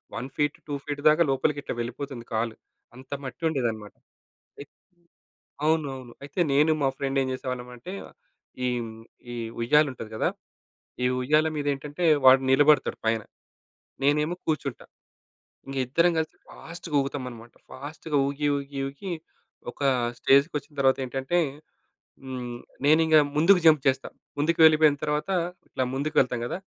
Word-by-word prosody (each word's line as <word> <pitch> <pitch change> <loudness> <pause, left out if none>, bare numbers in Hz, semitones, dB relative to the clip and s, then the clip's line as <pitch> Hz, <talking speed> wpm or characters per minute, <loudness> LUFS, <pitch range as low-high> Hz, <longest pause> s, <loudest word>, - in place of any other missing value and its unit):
1 125 +3 -4
feet, 150 0 0
2 145 - -4
feet 145 -1 -4
దాకా 155 +3 +4
లోపలికి 145 +2 0
ఇట్లా - - -4
వెళ్ళిపోతుంది 120 +1 -5
కాలు. 110 0 -1 0.4
అంత 130 +2 -14
మట్టి 130 +5 -8
ఉండేదనమాట. 115 -7 -2 0.7
అయ్ 140 - -9 1.0
అవునవును. 135 -6 -1
అయితే 145 +6 -5
నేను 150 +3 +4
మా 135 - +3
ఫ్రెండ్ 135 -1 -1
ఏం - - -2
జేసేవాళ్ళం 125 -1 -5
అంటే, 180 +11 -9 0.7
ఈ 125 - +2
హ్మ్, 110 -1 -8 0.4
ఈ - - -5 0.3
ఉయ్యాల 150 +6 +4
ఉంటది 115 -3 -9
గదా! - - +1 0.8
ఈ - - +2 0.2
ఉయ్యాల 155 +4 +3
మీద 145 - -3
ఏంటంటే 145 +5 -6 0.2
వాడు 130 +1 +8
నిలబడతాడు 145 +2 +4
పైన, 110 0 +2 0.8
నేనేమో 150 +4 +2
కూర్చుంటా. 145 -5 -2 0.8
ఇంక 135 - -6
ఇద్దరం 170 +6 +3
కలిసి 160 -1 -2
ఫాస్ట్‌గా 170 -2 -7
ఊగుతామన్నమాట. 125 -4 -5 0.2
ఫాస్ట్‌గా 150 +2 -4
ఊగి, 145 +1 -1
ఊగి, 140 0 -6
ఊగి, 160 +8 -7 0.6
ఒక - - -18 0.4
స్టేజ్‌కొచ్చిన 145 +1 +2
తరువాత 135 -1 +4
ఏంటంటే 135 +7 -2 0.9
హ్మ్, 125 -2 -5 0.3
నేనింకా 155 +1 +6 0.2
ముందుకు 180 +4 +5
జంప్ 155 -4 +6
చేస్తా. 130 0 0 0.3
ముందుకు 165 +3 +1
వెళ్ళిపోయిన 155 -2 +6
తరువాత 150 +5 -1 0.4
ఇట్లా 130 - -1
ముందుకు 145 +3 -3
వెళ్తాం 125 -2 0
కదా! 175 - -4
140 Hz, 135 wpm, -26 LUFS, 130-155 Hz, 1.0 s, వాడు